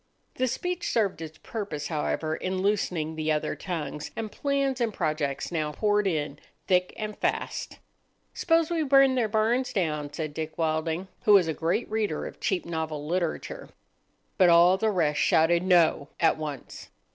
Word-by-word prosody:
The 255 - 0
speech 355 +7 -2
served 200 -7 0
its 160 -1 -8
purpose, 195 -10 -5
however, 155 0 -1
in 185 +2 -3
loosening 180 -6 0
the 155 0 -1
other 150 -1 -1
tongues, 150 -5 -5
and 220 -2 -4
plans 275 -2 -1
and 230 -2 +1
projects 155 -6 -2
now 155 -3 -2
poured 210 +2 +1
in 150 -5 -2 0.3
thick 180 -1 +2
and 215 -1 -4
fast. - - -3 0.6
"S'pose 330 -1 +2
we 335 -1 +1
burn 275 -2 +5
their 245 -4 +1
barns 230 +4 +1
down," 150 -8 -1
said 155 0 -4
Dick 160 0 -5
Wilding, 160 +2 -1 0.2
who 210 - +6
was 190 -4 +6
a 160 - 0
great 170 +9 -1
reader 215 -8 -2
of - - -9
cheap 190 -2 -1
novel 160 -3 -4
literature. 175 - -3 0.7
But 185 -2 +7
all 170 +2 +6
the 220 +3 +1
rest 160 -7 +1
shouted 170 +2 +4
"No" 170 -5 +3
at 165 - +4
once. 150 -4 -7
175 Hz, 165 wpm, -27 LUFS, 155-215 Hz, 0.7 s, But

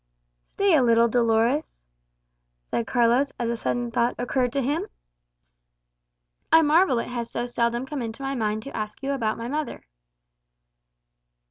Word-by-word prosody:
"Stay 395 -2 +2
a 290 - +5
little, 235 -1 +4
Dolores," 235 +4 +1 0.9
said 230 - -1
Carlos, 245 +3 +2
as 235 -1 -1
a - - -1
sudden 240 +1 -2
thought 235 +1 +1
occurred 245 0 0
to 280 - 0
him; 290 +6 -1 1.6
"I 325 0 +7
marvel 315 -2 +4
it 230 - -2
has 240 -1 -4
so 240 - -3
seldom 240 0 -1
come 275 0 -5
into 230 +3 -6
my 270 0 -2
mind 215 -3 -2
to 275 - -9
ask 215 +3 -5
you 275 - -1
about 225 -6 -1
my 230 - -5
mother." 300 +3 -4
240 Hz, 150 wpm, -25 LUFS, 230-275 Hz, 1.6 s, I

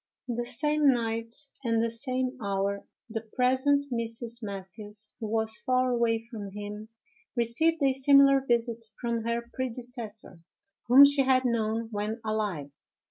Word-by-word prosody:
On 245 - -2
the 240 +1 -2
same 295 +3 +2
night, 230 -1 -2 0.3
and 230 -2 +1
at 225 - +3
the 230 - +1
same 255 +2 -1
hour, 200 0 -1 0.2
the 225 -1 -4
present 260 +5 +1
Mrs. 230 0 -1
Mathews, 205 +1 -8
who 220 - -4
was 220 0 0
far 255 0 +2
away 235 -2 +2
from 220 -4 -7
him, 210 +1 -7 0.5
received 280 +7 +1
a 270 - +4
similar 275 0 +5
visit 235 -2 0 0.2
from 235 -2 -2
her 235 0 -2
predecessor, 235 -6 -6 0.5
whom 265 +4 +9
she 285 0 +3
had 260 -1 +3
known 225 -1 0
when 210 +2 -3
alive. 205 -10 -2
235 Hz, 145 wpm, -28 LUFS, 220-255 Hz, 0.5 s, whom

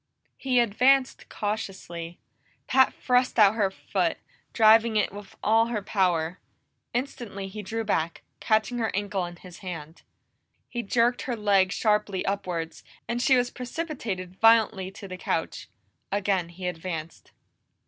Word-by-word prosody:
He 255 -2 +2
advanced 255 +4 +2
cautiously; 190 -5 -5 0.5
Pat 260 0 +4
thrust 250 0 +1
out 210 -2 +7
her 210 -3 +1
foot, 190 - -1 0.3
driving 225 0 +5
it 210 - +1
with 205 -1 -10
all 225 +2 +4
her 220 -4 -3
power. 180 -4 0 0.5
Instantly 240 -6 -4
he 210 +2 -7
drew 225 +3 -3
back, 170 -6 -1 0.2
catching 220 +3 +1
her 225 - 0
ankle 200 -2 -1
in 175 - -10
his 180 0 -13
hand. 165 -4 -8 0.7
He 240 - -4
jerked 235 +2 +1
her 245 - 0
leg 200 -4 +3
sharply 210 -3 +1
upwards, 180 -4 -3 0.2
and 240 +1 -1
she 260 0 +5
was 245 0 0
precipitated 240 - -5
violently 220 -4 +4
to 195 +1 -10
the 185 -1 -7
couch. - - -3 0.4
Again 195 -3 0
he 180 +2 -8
advanced. 165 -2 -6
205 Hz, 140 wpm, -26 LUFS, 185-235 Hz, 0.7 s, out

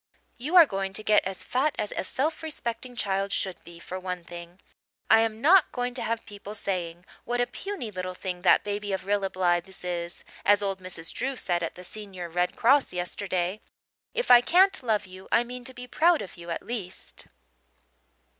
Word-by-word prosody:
You 300 +9 -2
are 345 -2 +11
going 195 -5 -3
to 215 - -7
get 210 0 +4
as 190 0 -4
fat 280 +4 0
as 210 - -2
a - - -1
self 295 +11 -1
respecting 255 -5 -5
child 195 -3 -1
should 190 -2 -1
be, 170 0 -12
for 185 +2 -6
one 180 -1 -4
thing. 175 +1 -10 0.5
I 225 - +8
am 225 0 0
not 350 +4 +6
going 245 0 -2
to 250 - -2
have 230 0 -2
people 205 0 -9
saying 180 -4 -3 0.2
'what 245 +1 -2
a 245 - +3
puny 385 - -5
little 185 -1 -4
thing 180 -1 -5
that 180 - +5
baby 205 -1 -3
of 190 - -3
Rilla 200 -1 +1
Blythe's 180 0 0
is' 175 -1 -4 0.2
as 205 0 +4
old 195 -1 -1
Mrs. 180 -3 -4
Drew 270 +2 -2
said 175 -7 0
at 165 - -3
the 180 - -10
senior 190 -3 -7
Red 180 +2 0
Cross 270 +4 +4
yesterday. 180 +2 -2 0.5
If 485 +1 +1
I 245 -1 +10
can't 375 +7 +4
love 220 -4 0
you 185 0 -12
I 235 - +5
mean 250 +1 -7
to 260 - -4
be 245 - -7
proud 330 +6 +3
of 190 - -10
you 170 0 -10
at 170 - -3
least." 205 -6 -7
200 Hz, 200 wpm, -27 LUFS, 180-245 Hz, 0.5 s, are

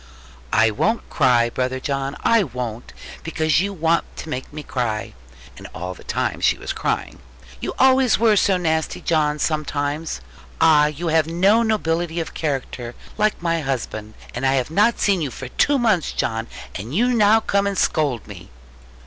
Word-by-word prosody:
'I 110 0 +4
won't 220 - 0
cry, 120 -4 +3
brother 130 +1 -2
John, 135 +1 -3
I 230 -1 +4
won't; 125 - -6 0.3
because 160 -2 +1
you 200 +1 -1
want 165 -2 +1
to 160 - -7
make 130 -3 -5
me 150 0 -7
cry' 115 -6 -3 0.5
and - - -9
all 90 +2 -5
the - - -15
time - - -2
she - - +3
was - - -4
crying - - -2 0.4
'you - - -4
always 260 -2 +4
were 225 -2 +4
so 195 -1 +3
nasty, 160 -3 -1
John, 150 -2 +1
sometimes. 150 0 -2 0.4
Ah, 150 -2 +5
you 155 +3 -3
have 160 -1 +3
no 190 +7 +3
nobility 175 -6 0
of 165 - -4
character, 130 -5 -4 0.2
like 210 -4 +1
my 165 -1 +1
husband. 110 -6 -4 0.2
And 120 - -5
I 135 0 +3
have 130 +2 -1
not 210 +7 +3
seen 195 -4 +2
you 145 - -1
for 130 0 -8
two 285 - +2
months, 220 - +1
John; 115 0 -2 0.3
and 105 +4 -6
now 220 - +4
you 225 - +3
come 200 -2 +1
to 200 0 -1
scold 145 - 0
me!' 95 -5 -11
155 Hz, 175 wpm, -21 LUFS, 130-195 Hz, 0.5 s, Ah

